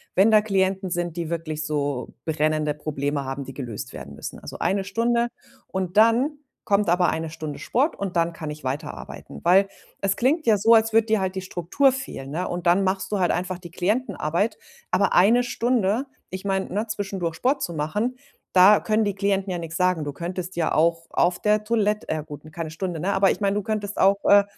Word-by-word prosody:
wenn 205 +4 +5
da 215 - +6
Klienten 190 -2 0
sind, 175 -1 -2
die 170 -2 -3
wirklich 155 -2 -3
so 145 -4 -2
brennende 155 -1 +1
Probleme 145 -1 -3
haben, 135 +1 -4
die 135 - -9
gelöst 120 -7 -6
werden 70 +1 -9
müssen." - - -7
Also - - -9
eine 195 0 +1
Stunde 235 +3 +1 0.4
und 185 -1 -3
dann 240 +7 +4 0.3
kommt 200 -2 +2
aber 175 +1 +3
eine 160 0 -2
Stunde 155 -2 -6
Sport 280 +7 0
und 195 -2 -4
dann 170 0 +2
kann 155 -2 -6
ich 150 0 -9
weiterarbeiten. 140 +4 -6
Weil 190 +3 +5 0.3
es 195 -1 +1
klingt 300 +6 +1
ja 220 -2 +5
so, 220 +4 +5
als 225 0 +3
würde 225 0 +4
dir 220 -1 +2
halt 190 0 -2
die 190 - -2
Struktur 185 - +1
fehlen, 260 - -6
ne? 180 +4 -2
Und 175 0 -3
dann 180 +3 +4
machst 190 0 -1
du 205 - 0
halt 180 - +2
einfach 180 +1 -2
die 175 -2 -11
Klientenarbeit, 200 0 -1 0.3
aber 195 +2 +2
eine 230 +7 +5
Stunde 240 -1 0 0.3
ich 190 +1 -6
meine, 190 -1 0
ne, 210 +4 -1
zwischendurch 195 -5 -3
Sport 265 - 0
zu 170 - -3
machen, 205 +12 -1 0.4
da 190 +3 +7
können 220 0 +1
die 205 -2 -1
Klienten 195 -1 0
ja 180 - -2
nix 165 -1 -5
sagen. 180 -3 +2
Du 145 -1 -4
könntest 180 +3 -5
ja 165 - +1
auch 165 +1 +2
auf 175 +1 +1
der 210 0 +2
Toilett 210 -1 0
äh, - - +1
ja, 155 - -3
gut, 150 -1 -10
n 155 - -12
keine 165 0 -5
Stunde, 170 0 -4
ne? 195 +4 0
Aber 195 0 +4
ich - - -4
meine, 200 0 +1
du 210 - -1
könntest 205 -1 -3
auch, 195 +1 +4
äh, 205 0 +7
190 Hz, 215 wpm, -24 LUFS, 165-210 Hz, 0.4 s, da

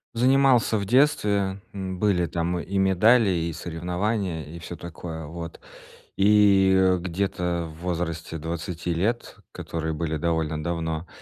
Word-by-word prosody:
Занимался 130 -2 +4
в 100 - -2
детстве, 100 -6 +2
м, 95 -2 -5
были 95 -5 +2
там 85 +1 -2
и 95 +4 -4
медали, 100 +4 +4
и 85 -2 -1
соревнования, 90 +2 -2
и 85 +3 -9
всё 85 +1 -7
такое, 80 -1 -7
вот. 85 +2 -8 0.6
И, 100 -1 +5
э, 95 -1 +4
где-то 90 -1 -2
в 80 +2 -13
возрасте 85 -2 -3
20 85 +2 -4
лет, 110 +8 -2
которые 80 -1 -4
были 80 0 -2
довольно 80 -1 -1
давно, 80 0 -3
90 Hz, 135 wpm, -25 LUFS, 80-100 Hz, 0.6 s, И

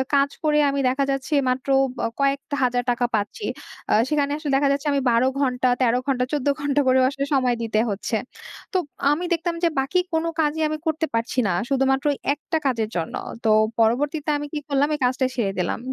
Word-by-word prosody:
কাজ 280 0 +3
করে 300 -1 +3
আমি 280 0 -1
দেখা 275 +2 0
যাচ্ছে 270 +3 -3 0.2
মাত্র 255 +2 -2 0.3
ব - - -19 0.2
কয়েকটা 280 +1 0
হাজার 245 0 +1
টাকা 245 0 0
পাচ্ছি। 210 - -3 0.5
আ - - +4 0.2
সেখানে 285 -2 +1
আসলে 305 -2 -3
দেখা 280 +1 +3
যাচ্ছে 280 +2 -1
আমি 280 - +1
১২ 235 +3 +3
ঘণ্টা, 255 -2 +1
১৩ 245 0 +3
ঘণ্টা, 255 -2 +1
১৪ 290 -2 -1
ঘণ্টা 285 0 +1
করেও 255 0 +4
আসলে 275 -1 -3
সময় 255 -3 +2
দিতে 215 -1 0
হচ্ছে। 205 +3 -2 0.6
তো - - +3 0.3
আমি 315 +5 0
দেখতাম 335 0 -1
যে 340 - +4
বাকি 275 +7 +1
কোনো 320 +1 +1
কাজই 310 0 +1
আমি 310 - -2
করতে 320 0 0
পারছি 230 +3 -2
না। - - +1 0.2
শুধুমাত্র 270 0 +1 0.3
একটা 295 +2 -3
কাজের 230 -5 0
জন্য। 165 -1 -3 0.3
তো 225 - +2 0.3
পরবর্তীতে 285 +7 +1
আমি 290 - -4
কি 300 - -1
করলাম? 280 0 +2
এই - - -7
কাজটা 255 +1 +1
ছেড়ে 210 -6 0
দিলাম। 180 - -1
275 Hz, 195 wpm, -23 LUFS, 250-295 Hz, 0.6 s, আ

